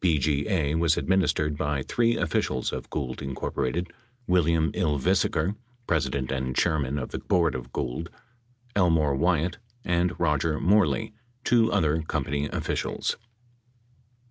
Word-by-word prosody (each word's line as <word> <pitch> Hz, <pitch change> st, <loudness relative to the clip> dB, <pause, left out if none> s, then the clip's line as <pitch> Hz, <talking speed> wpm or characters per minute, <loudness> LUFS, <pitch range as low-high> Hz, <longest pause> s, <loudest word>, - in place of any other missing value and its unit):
BGA 80 Hz, 0 st, +1 dB
was 85 Hz, -1 st, +3 dB
administered 85 Hz, -5 st, +1 dB
by 75 Hz, -2 st, -1 dB
three 115 Hz, -, +1 dB
officials 65 Hz, -, -1 dB
of -, -, -5 dB
Gould, 65 Hz, -4 st, -3 dB
Inc.: 70 Hz, +4 st, -2 dB, 0.4 s
William 85 Hz, -3 st, +2 dB
Ylvisaker, 85 Hz, +3 st, +1 dB, 0.3 s
president 70 Hz, -, 0 dB
and 65 Hz, -1 st, -2 dB
chairman 75 Hz, -5 st, +1 dB
of 65 Hz, -, -4 dB
the -, -, -3 dB
board 85 Hz, -3 st, +2 dB
of 60 Hz, -1 st, -6 dB
Gould, 65 Hz, +9 st, -3 dB, 0.7 s
Elmore 80 Hz, -7 st, +3 dB
Wyatt, 85 Hz, +5 st, +1 dB, 0.3 s
and 90 Hz, 0 st, +1 dB
Roger 75 Hz, -1 st, +1 dB
Moreley, 105 Hz, +3 st, +2 dB, 0.3 s
two 115 Hz, -2 st, +3 dB
other 80 Hz, -5 st, +2 dB
company 75 Hz, -2 st, -2 dB
officials. -, -, -2 dB
80 Hz, 115 wpm, -26 LUFS, 70-90 Hz, 0.7 s, was